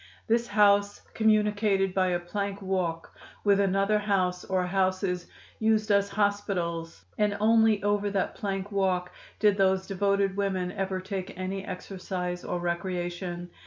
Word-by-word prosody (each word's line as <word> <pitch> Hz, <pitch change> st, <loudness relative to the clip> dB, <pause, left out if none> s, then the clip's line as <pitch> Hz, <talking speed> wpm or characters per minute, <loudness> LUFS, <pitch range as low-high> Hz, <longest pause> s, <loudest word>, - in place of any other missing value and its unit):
This 235 Hz, +1 st, +1 dB
house 205 Hz, -1 st, +3 dB
communicated 210 Hz, -3 st, +2 dB
by 185 Hz, -1 st, +2 dB
a 175 Hz, -1 st, +1 dB
plank 200 Hz, +3 st, -4 dB
walk 180 Hz, -4 st, -2 dB, 0.3 s
with 200 Hz, -1 st, +4 dB
another 200 Hz, +2 st, +2 dB
house, 185 Hz, -3 st, 0 dB
or 185 Hz, -1 st, 0 dB
houses, 185 Hz, -1 st, 0 dB, 0.3 s
used 220 Hz, -1 st, +2 dB
as 200 Hz, 0 st, +3 dB
hospitals, 195 Hz, -5 st, -2 dB
and 210 Hz, -1 st, +2 dB
only 220 Hz, -1 st, +4 dB
over 205 Hz, 0 st, +1 dB
that 195 Hz, -1 st, -1 dB
plank 195 Hz, 0 st, -4 dB
walk 185 Hz, -2 st, 0 dB, 0.3 s
did 205 Hz, -2 st, +3 dB
those 190 Hz, -1 st, +2 dB
devoted 200 Hz, 0 st, +1 dB
women 190 Hz, -3 st, -1 dB
ever 190 Hz, 0 st, -2 dB
take 190 Hz, -1 st, -5 dB
any 190 Hz, +1 st, -3 dB
exercise 180 Hz, -1 st, -5 dB
or 175 Hz, -, -3 dB
recreation. 175 Hz, 0 st, -3 dB
195 Hz, 135 wpm, -28 LUFS, 180-205 Hz, 0.3 s, with